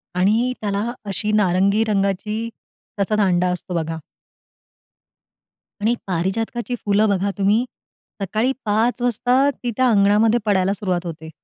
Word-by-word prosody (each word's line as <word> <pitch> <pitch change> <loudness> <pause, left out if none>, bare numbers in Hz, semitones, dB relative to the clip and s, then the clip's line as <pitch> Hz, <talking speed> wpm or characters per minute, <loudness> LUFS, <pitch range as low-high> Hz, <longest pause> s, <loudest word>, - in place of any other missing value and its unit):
आणि 220 +7 +2
त्याला 205 +2 -1
अशी 205 +2 -1
नारंगी 200 +1 +3
रंगाची, 210 +2 -1 0.5
त्याचा 200 +2 0
दांडा 180 -4 +2
असतो 180 0 -5
बघा. 160 -1 -2 1.8
आणि 220 +3 +2
पारिजातकाची 225 +7 -2
फुलं 205 +1 +3
बघा 200 0 0
तुम्ही, 205 +4 +2 0.6
सकाळी 215 +6 0
5 225 +4 +1
वाजता 245 +3 +2
ती 245 -2 -5
त्या 255 -1 +3
अंगणामध्ये 215 +2 +4
पडायला 195 -2 +2
सुरुवात 185 -3 -2
होते. 160 -1 -7
205 Hz, 120 wpm, -21 LUFS, 190-225 Hz, 1.8 s, अंगणामध्ये